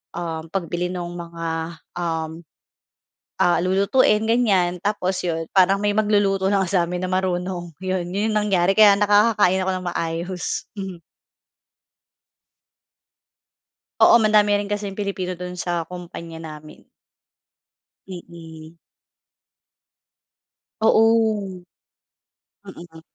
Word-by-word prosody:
um, 165 Hz, -2 st, -5 dB
pagbili 180 Hz, -1 st, -2 dB
nung 175 Hz, -1 st, -5 dB
mga, 165 Hz, -1 st, -5 dB, 0.2 s
um, 165 Hz, -1 st, -3 dB, 1.0 s
ah, 175 Hz, -, +4 dB
lulutuin 200 Hz, +3 st, +3 dB
ganyan, 195 Hz, -7 st, +2 dB
tapos 190 Hz, -3 st, -1 dB
yun, 165 Hz, -2 st, -2 dB
parang 195 Hz, +1 st, +4 dB
may 205 Hz, -, +1 dB
magluluto 205 Hz, -2 st, +2 dB
lang 195 Hz, -1 st, +2 dB
sa'min 180 Hz, -2 st, 0 dB
na 185 Hz, -, -2 dB
marunong. 180 Hz, -2 st, -2 dB
Yun, 185 Hz, -1 st, -3 dB
yun, 205 Hz, +3 st, 0 dB
yung 215 Hz, -, +1 dB
nangyari, 195 Hz, -1 st, +2 dB
kaya 210 Hz, -2 st, +8 dB
nakakakain 205 Hz, -2 st, +3 dB
ako 190 Hz, -, 0 dB
nang 185 Hz, -1 st, -4 dB
maayos. 170 Hz, +2 st, -4 dB
Mhm. 190 Hz, -3 st, -6 dB, 3.0 s
Oo, -, -, +8 dB
madami 210 Hz, -2 st, +3 dB
rin 205 Hz, -, -3 dB
kasing 205 Hz, -1 st, -4 dB
Pilipino 190 Hz, -3 st, -3 dB
du'n 180 Hz, 0 st, -6 dB
sa 175 Hz, -2 st, -3 dB
kumpanya 170 Hz, -2 st, -9 dB
namin. 155 Hz, -1 st, -11 dB, 1.3 s
Mm. 165 Hz, -3 st, -11 dB, 2.1 s
Oo. 220 Hz, -4 st, +2 dB, 1.0 s
Mm. 170 Hz, -4 st, -12 dB
185 Hz, 100 wpm, -22 LUFS, 170-200 Hz, 3.0 s, kaya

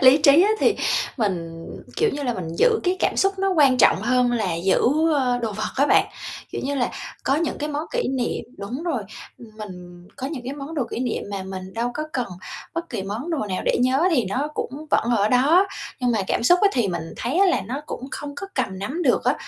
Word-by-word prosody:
lý 260 Hz, +2 st, +8 dB
trí 290 Hz, +3 st, +7 dB
á 415 Hz, -, +3 dB
thì -, -, +3 dB, 0.4 s
mình, 165 Hz, -7 st, -2 dB, 0.3 s
kiểu 450 Hz, -2 st, +3 dB
như 290 Hz, -, -4 dB
là, 245 Hz, -4 st, -1 dB
mình 175 Hz, -3 st, -5 dB
giữ 450 Hz, -3 st, +4 dB
cái 365 Hz, +1 st, +2 dB
cảm -, -, +1 dB
xúc 390 Hz, 0 st, +2 dB
nó 390 Hz, 0 st, +1 dB
quan 280 Hz, -8 st, +4 dB
trọng 195 Hz, -, +5 dB
hơn 250 Hz, +1 st, +3 dB
là 210 Hz, -8 st, 0 dB
giữ, 185 Hz, +3 st, +2 dB, 0.3 s
ơ, 250 Hz, -3 st, +1 dB
đồ 220 Hz, -2 st, -1 dB
vật 215 Hz, +1 st, -3 dB
á 280 Hz, -, +4 dB
bạn. -, -, +4 dB, 0.5 s
Kiểu -, -, -3 dB
như 280 Hz, +1 st, -1 dB
là, 250 Hz, -3 st, 0 dB, 0.3 s
có 270 Hz, -, +3 dB
những 325 Hz, 0 st, -1 dB
cái 300 Hz, -, -2 dB
món 300 Hz, +1 st, -2 dB
kỷ -, -, 0 dB
niệm 260 Hz, -2 st, -2 dB
đúng 240 Hz, +9 st, -5 dB
rồi, 275 Hz, -11 st, -1 dB, 0.4 s
mình 185 Hz, -6 st, -11 dB
có 265 Hz, -1 st, -4 dB
những 275 Hz, -4 st, -5 dB
cái 265 Hz, -, -4 dB
món 290 Hz, +3 st, -7 dB
đồ 275 Hz, -5 st, 0 dB
kỷ -, -, -3 dB
niệm 250 Hz, -3 st, -1 dB
mà 195 Hz, -1 st, -3 dB
mình 190 Hz, 0 st, -7 dB
đâu 235 Hz, +2 st, -1 dB
có 305 Hz, -, -2 dB
cần 250 Hz, -2 st, -1 dB, 0.5 s
bất 335 Hz, 0 st, -3 dB
kỳ 225 Hz, -7 st, -3 dB
món 220 Hz, -, -4 dB
đồ 320 Hz, -, 0 dB
nào 185 Hz, -, -2 dB
để -, -, +2 dB
nhớ 260 Hz, +5 st, +3 dB
thì 250 Hz, -, +2 dB
nó 260 Hz, +10 st, -1 dB
cũng 295 Hz, +4 st, -5 dB
vẫn -, -, +3 dB
ở 205 Hz, +1 st, +2 dB
đó. 295 Hz, -, +5 dB, 0.3 s
Nhưng 250 Hz, -1 st, +2 dB
mà 220 Hz, -, +1 dB
cảm -, -, 0 dB
xúc 350 Hz, +9 st, +5 dB
á 410 Hz, -, +7 dB
thì 235 Hz, -6 st, +1 dB
mình 165 Hz, -2 st, -4 dB
thấy 265 Hz, +10 st, -1 dB
á 395 Hz, -, +6 dB
là 360 Hz, -, +2 dB
nó 255 Hz, +8 st, -4 dB
cũng 265 Hz, -, -6 dB
không 285 Hz, -1 st, -6 dB
có 390 Hz, -, -6 dB
cầm 195 Hz, -8 st, -2 dB
nắm 270 Hz, -, -3 dB
được -, -, +2 dB
á, -, -, +3 dB
255 Hz, 245 wpm, -23 LUFS, 210-300 Hz, 0.5 s, lý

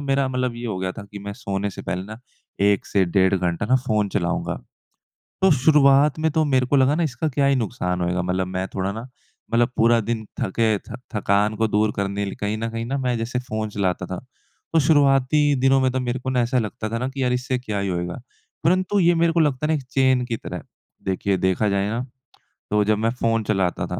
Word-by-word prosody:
मेरा 135 Hz, 0 st, +2 dB
मतलब 125 Hz, -2 st, -1 dB
ये 120 Hz, 0 st, -5 dB
हो 95 Hz, -4 st, -3 dB
गया 95 Hz, 0 st, -2 dB
था 110 Hz, -, -8 dB
कि 105 Hz, -, -8 dB
मैं 100 Hz, 0 st, -6 dB
सोने 100 Hz, 0 st, -3 dB
से -, -, -9 dB
पहले 90 Hz, 0 st, -3 dB
ना 110 Hz, +2 st, -9 dB, 0.5 s
1 100 Hz, -, 0 dB
से 95 Hz, -2 st, +2 dB
डेढ़ 95 Hz, +2 st, +2 dB
घंटा 90 Hz, +2 st, -1 dB
ना 130 Hz, +2 st, +4 dB
फ़ोन 105 Hz, -2 st, +1 dB
चलाऊँगा। 90 Hz, -4 st, -2 dB, 0.8 s
तो 190 Hz, -, +6 dB
शुरुआत 140 Hz, +1 st, +4 dB
में 160 Hz, 0 st, +1 dB
तो 155 Hz, 0 st, +2 dB
मेरे 130 Hz, -3 st, +2 dB
को 140 Hz, -, +2 dB
लगा 135 Hz, +2 st, +4 dB
ना 170 Hz, -, 0 dB
इसका 155 Hz, +1 st, -1 dB
क्या 140 Hz, 0 st, +1 dB
ही 140 Hz, -1 st, +3 dB
नुकसान 100 Hz, -6 st, -2 dB
होएगा? 90 Hz, 0 st, 0 dB
मतलब 90 Hz, +1 st, -1 dB
मैं 95 Hz, +1 st, -3 dB
थोड़ा 95 Hz, +1 st, -1 dB
ना, 110 Hz, -, -6 dB, 0.5 s
मतलब 120 Hz, +1 st, +3 dB
पूरा 115 Hz, +1 st, +4 dB
दिन 110 Hz, 0 st, -3 dB, 0.2 s
थके 110 Hz, +2 st, +1 dB
थ -, -, -13 dB, 0.2 s
थकान 105 Hz, +1 st, +1 dB
को 110 Hz, +1 st, +2 dB
दूर 105 Hz, +1 st, +1 dB
करने 100 Hz, 0 st, -1 dB
ल 100 Hz, -, -4 dB
कहीं 105 Hz, +1 st, -1 dB
न 115 Hz, +1 st, -2 dB
कहीं 115 Hz, 0 st, -4 dB
ना 135 Hz, +2 st, -2 dB
मैं 125 Hz, -2 st, 0 dB
जैसे 120 Hz, +2 st, -2 dB
फ़ोन 110 Hz, -3 st, -3 dB
चलाता 95 Hz, -3 st, -1 dB
था। 95 Hz, -, -5 dB, 0.5 s
तो 165 Hz, -, +4 dB
शुरुआती 140 Hz, -1 st, +4 dB, 0.2 s
दिनों 135 Hz, 0 st, +4 dB
में 130 Hz, -1 st, +2 dB
तो 130 Hz, -, -1 dB
मेरे 125 Hz, 0 st, -2 dB
को 130 Hz, -, -3 dB
ना 125 Hz, -1 st, +1 dB
ऐसा 125 Hz, +2 st, +1 dB
लगता 110 Hz, -1 st, -3 dB
था 115 Hz, -, -2 dB
ना 130 Hz, +2 st, -2 dB
कि 135 Hz, 0 st, -5 dB
यार 125 Hz, -, +2 dB
इससे 125 Hz, 0 st, -1 dB
क्या 110 Hz, -5 st, -4 dB
ही 100 Hz, 0 st, -1 dB
होएगा? 90 Hz, +5 st, -3 dB, 0.4 s
परंतु 185 Hz, +4 st, +2 dB
ये 175 Hz, -1 st, +4 dB
मेरे 165 Hz, 0 st, +2 dB
को 170 Hz, -, +2 dB
लगता 145 Hz, -1 st, +1 dB
है -, -, -3 dB
ना 160 Hz, -, +2 dB
एक 140 Hz, -, -5 dB
चैन 130 Hz, -2 st, +3 dB
की 120 Hz, -2 st, -3 dB
तरह। -, -, -7 dB, 0.4 s
देखिए 95 Hz, +1 st, 0 dB
देखा 95 Hz, +3 st, +1 dB
जाए 100 Hz, 0 st, 0 dB
ना, 115 Hz, -, -2 dB, 0.7 s
तो 105 Hz, 0 st, +3 dB
जब 110 Hz, 0 st, +2 dB
मैं 110 Hz, +2 st, +1 dB
फ़ोन 115 Hz, -1 st, +2 dB
चलाता 95 Hz, -4 st, 0 dB
था -, -, -4 dB
115 Hz, 235 wpm, -22 LUFS, 100-130 Hz, 0.8 s, तो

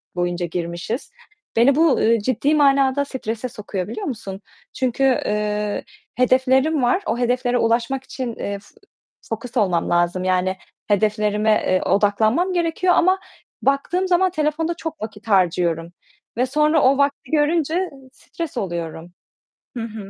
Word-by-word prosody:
boyunca 175 Hz, 0 st, -1 dB
girmişiz. 170 Hz, -, -4 dB, 0.4 s
Beni 245 Hz, +4 st, +5 dB
bu, 315 Hz, -3 st, +3 dB
eee, 230 Hz, +1 st, +3 dB
ciddi 260 Hz, +7 st, +1 dB
manada 275 Hz, -1 st, +3 dB
strese 250 Hz, -3 st, -4 dB
sokuyor 200 Hz, -4 st, -5 dB
biliyor 220 Hz, 0 st, -5 dB
musun? 205 Hz, -7 st, -6 dB, 0.3 s
Çünkü, 260 Hz, +1 st, -1 dB
eee, 210 Hz, -4 st, 0 dB, 0.3 s
hedeflerim 260 Hz, +4 st, +3 dB
var, 245 Hz, +11 st, +2 dB
o 235 Hz, -, -1 dB
hedeflere 245 Hz, 0 st, +1 dB
ulaşmak 235 Hz, +3 st, 0 dB
için, 250 Hz, -3 st, -5 dB
eee, 200 Hz, 0 st, -4 dB, 0.7 s
fokus 230 Hz, +3 st, -5 dB
olmam 185 Hz, -6 st, +1 dB
lazım, 175 Hz, +1 st, +1 dB
yani, 185 Hz, 0 st, +1 dB, 0.3 s
hedeflerime, 210 Hz, +1 st, +1 dB
eee, 185 Hz, -3 st, +2 dB
odaklanmam 215 Hz, -, +2 dB
gerekiyor 350 Hz, +1 st, +1 dB
ama 370 Hz, +2 st, +3 dB, 0.4 s
baktığım 320 Hz, +7 st, +1 dB
zaman 370 Hz, 0 st, +3 dB
telefonda 310 Hz, +1 st, -1 dB
çok 320 Hz, -5 st, -6 dB
vakit 215 Hz, 0 st, -8 dB
harcıyorum 175 Hz, -4 st, +1 dB, 0.5 s
ve 250 Hz, -, +2 dB
sonra 300 Hz, +3 st, +2 dB
o 265 Hz, +1 st, +4 dB
vakti 280 Hz, -1 st, 0 dB
görünce 320 Hz, +4 st, +1 dB, 0.2 s
stres 330 Hz, -2 st, -7 dB
oluyorum. 170 Hz, -3 st, -4 dB, 0.6 s
Hı 230 Hz, -, -3 dB
hı. 215 Hz, -3 st, -7 dB
240 Hz, 130 wpm, -21 LUFS, 205-285 Hz, 0.7 s, Beni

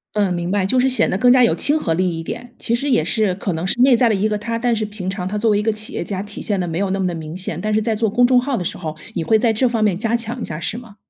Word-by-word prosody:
嗯， 200 Hz, -3 st, +1 dB
明 175 Hz, 0 st, -3 dB
白。 200 Hz, -1 st, +1 dB
就 225 Hz, +7 st, +1 dB
是 260 Hz, +1 st, +3 dB
显 260 Hz, -, +4 dB
得 190 Hz, -, 0 dB
更 245 Hz, +4 st, +4 dB
加 255 Hz, 0 st, +5 dB
有 235 Hz, -, +3 dB
亲 300 Hz, +2 st, +3 dB
和 165 Hz, -, -1 dB
力 175 Hz, -1 st, -1 dB
一 -, -, -4 dB
点， 245 Hz, +8 st, -7 dB
其 235 Hz, -, 0 dB
实 280 Hz, +4 st, -2 dB
也 205 Hz, -, +3 dB
是 195 Hz, +4 st, 0 dB
可 190 Hz, -1 st, -3 dB
能 165 Hz, +2 st, -3 dB
是 190 Hz, -, -1 dB
内 255 Hz, -1 st, +6 dB
在 235 Hz, 0 st, +3 dB
的 215 Hz, -, +2 dB
一 200 Hz, +2 st, +1 dB
个 210 Hz, -1 st, -1 dB
他， 230 Hz, +2 st, -4 dB
但 240 Hz, 0 st, +1 dB
是 220 Hz, -, -2 dB
平 205 Hz, -3 st, -5 dB
常 190 Hz, -1 st, -4 dB
他 200 Hz, +3 st, -3 dB
作 225 Hz, +2 st, +1 dB
为 210 Hz, -, +3 dB
一 210 Hz, -, -1 dB
个 220 Hz, -, +1 dB
企 215 Hz, 0 st, -2 dB
业 -, -, -3 dB
家， 195 Hz, -2 st, -4 dB
体 205 Hz, 0 st, -7 dB
现 205 Hz, -3 st, -1 dB
得 180 Hz, -, -2 dB
没 165 Hz, +1 st, -3 dB
有 200 Hz, -1 st, 0 dB
那 195 Hz, +1 st, -1 dB
么 190 Hz, -, 0 dB
的 175 Hz, -, -3 dB
明 160 Hz, 0 st, -7 dB
显。 180 Hz, -3 st, -3 dB
但 215 Hz, +2 st, -1 dB
是 215 Hz, -, +2 dB
在 220 Hz, 0 st, -1 dB
做 220 Hz, 0 st, 0 dB
公 245 Hz, +4 st, +3 dB
众 250 Hz, 0 st, +4 dB
号 255 Hz, 0 st, -2 dB
的 180 Hz, -, -4 dB
时 -, -, -4 dB
候， 155 Hz, -3 st, -6 dB, 0.2 s
你 170 Hz, -, -2 dB
会 220 Hz, +7 st, +3 dB
在 230 Hz, 0 st, +2 dB
这 245 Hz, +3 st, +2 dB
方 230 Hz, -2 st, -1 dB
面 200 Hz, -4 st, +1 dB
加 225 Hz, +3 st, -1 dB
强 235 Hz, +1 st, -1 dB
一 -, -, -2 dB
下 155 Hz, -, -5 dB
是 165 Hz, +7 st, -3 dB
吗？ 230 Hz, -4 st, -12 dB
210 Hz, 390 characters per minute, -19 LUFS, 185-235 Hz, 0.2 s, 内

